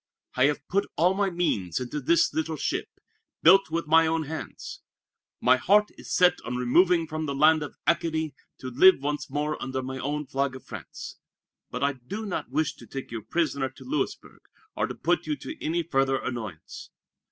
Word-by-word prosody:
I 130 - +3
have 145 -1 0
put 200 +2 0
all 175 +4 +4
my 200 0 +1
means 105 - -1
into 130 +4 -4
this 165 +5 +3
little 160 0 -2
ship, - - -2 0.6
built 195 +2 +7
with 165 +1 -2
my 160 +1 +5
own 160 0 0
hands. 155 +2 -7 0.6
My 130 +1 +5
heart 205 +11 +3
is - - -11
set 180 0 +4
on 125 - -4
removing 170 +7 +3
from 155 0 -4
the 140 - -2
land 155 +2 +5
of 150 - -6
Acadie, 160 -3 0 0.2
to 130 - -7
live 185 +10 +7
once 145 +1 -3
more 150 +1 -2
under 130 0 -3
my 130 0 -5
own 145 +3 -2
flag 135 0 -1
of 130 - -11
France. - - -9 0.5
But - - -4
I 140 0 +2
do 135 - -7
not 200 - -4
wish 150 +3 0
to - - -13
take 135 -3 -7
you 115 - -3
a - - -16
prisoner 140 -5 -1
to 130 - -15
Louisburg, 300 +4 -3 0.3
or - - 0
to - - -6
put - - 0
you 300 - 0
to 315 +2 -9
any 170 +2 0
further 135 -4 +1
annoyance. 110 -11 -6
150 Hz, 195 wpm, -27 LUFS, 135-170 Hz, 0.6 s, built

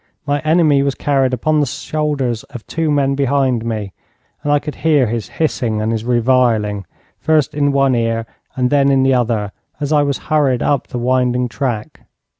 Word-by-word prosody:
My 145 0 0
enemy 155 -2 +3
was 140 -1 0
carried 135 -3 +1
upon 150 +5 +1
the 145 - +1
shoulders 145 -3 -2
of 120 - -10
two 165 -1 -2
men 140 -2 +2
behind 135 -3 +1
me, 110 -4 -4 0.5
and 145 - -1
I 145 - +5
could 150 +1 -5
hear 150 -4 +3
his 115 -1 -3
hissing 120 -8 -1
and 110 +1 -1
his 110 -1 -2
reviling, 115 -4 +1 0.3
first 155 -2 +1
in 145 -1 +1
one 135 -1 +2
ear 115 -1 0 0.3
and 125 -1 0
then 140 -1 +4
in 135 -1 +3
the 135 0 +3
other, 115 -5 0 0.3
as 145 +1 -1
I 150 - +4
was 140 -2 0 0.2
hurried 135 -5 +2
up 140 -3 0
the - - -5
winding 125 0 +1
track. 120 -5 -4
135 Hz, 185 wpm, -17 LUFS, 120-145 Hz, 0.5 s, I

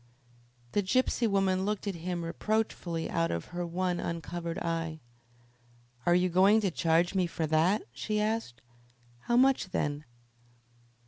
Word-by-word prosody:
The 205 - +2
gypsy 240 +3 +1
woman 195 -2 +1
looked 210 0 -2
at 200 - -1
him 170 0 -4
reproachfully 175 -2 -2
out 165 0 0
of 85 - -3
her 175 0 -2
one 175 +1 -1
uncovered 170 0 -4
eye. 165 -4 -2 1.1
"Are 175 - +5
you 180 +1 +3
going 190 +5 +5
to 195 -3 0
charge 165 +1 +2
me 185 -2 +1
for 165 -1 -2
that?" 160 +7 +2
she 210 - -2
asked. 215 - -2 0.6
"How 240 - +2
much, 260 -6 +4
then?" 145 -3 -2
180 Hz, 140 wpm, -30 LUFS, 165-205 Hz, 1.1 s, Are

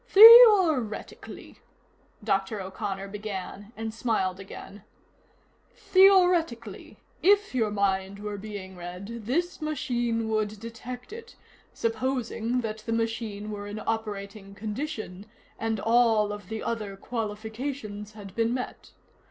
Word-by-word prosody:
"Theoretically 395 - +6 0.3
" - - -30
Dr. 195 +2 0
O'Connor 195 +1 -5
began, 205 0 -7
and 225 0 -4
smiled 215 -6 -1
again 195 +1 -10 0.9
"Theoretically, 355 - +3 0.2
if 405 +3 +3
your 225 -4 +1
mind 195 -1 -1
were 205 0 -6
being 195 -2 -8
read, 185 +6 -8
this 345 +7 -1
machine 240 -7 -1
would 215 -1 -1
detect 240 - -8
it, 460 0 -10 0.4
supposing 235 0 -2
that 220 -1 -4
the 225 +1 -4
machine 225 -2 -3
were 205 -1 -6
in 205 +1 -6
operating 205 -2 -4
condition 215 -2 -5 0.3
and 225 -1 -1
all 225 -1 +3
of 205 0 -10
the 220 0 -4
other 210 -4 -4
qualifications 215 0 -5
had 205 -2 -11
been 230 +1 +1
met. 250 - -7
220 Hz, 115 wpm, -27 LUFS, 205-245 Hz, 0.9 s, Theoretically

